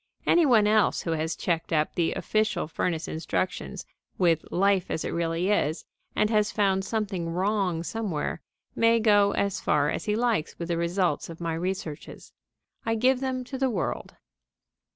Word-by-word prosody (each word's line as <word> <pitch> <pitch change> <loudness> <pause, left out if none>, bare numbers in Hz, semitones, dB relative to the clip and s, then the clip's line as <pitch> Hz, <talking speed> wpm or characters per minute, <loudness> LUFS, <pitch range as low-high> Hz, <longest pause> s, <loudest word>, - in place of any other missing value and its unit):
Any 340 -3 +4
one 225 -5 +5
else 215 -1 +3
who 165 - -2
has 160 0 -1
checked 165 -2 -2
up 155 -1 +1
the 170 -2 0
official 215 -5 0
furnace 165 0 -2
instructions 180 +4 -3 0.3
with 165 -4 +3
Life 195 0 +2
as 160 - -2
it - - -2
really 170 +3 0
is 160 -6 0 0.3
and 215 +1 +2
has 210 -1 +2
found 195 -2 +1
something 200 -6 -2
wrong 185 -1 0
somewhere 185 -7 -3 0.3
may 230 0 +4
go 205 -2 +4
as 200 -1 -1
far 150 0 +2
as - - -4
he 210 - +1
likes 230 -8 0
with 170 0 -5
the 170 - +1
results 170 -2 0
of 165 - -9
my 165 -1 -2
researches. 165 -3 -5 0.5
I 225 0 0
give 250 +3 +3
them 260 -1 -2
to 260 +1 -7
the 265 -1 +2
world. 195 -8 -3
190 Hz, 170 wpm, -27 LUFS, 165-215 Hz, 0.5 s, one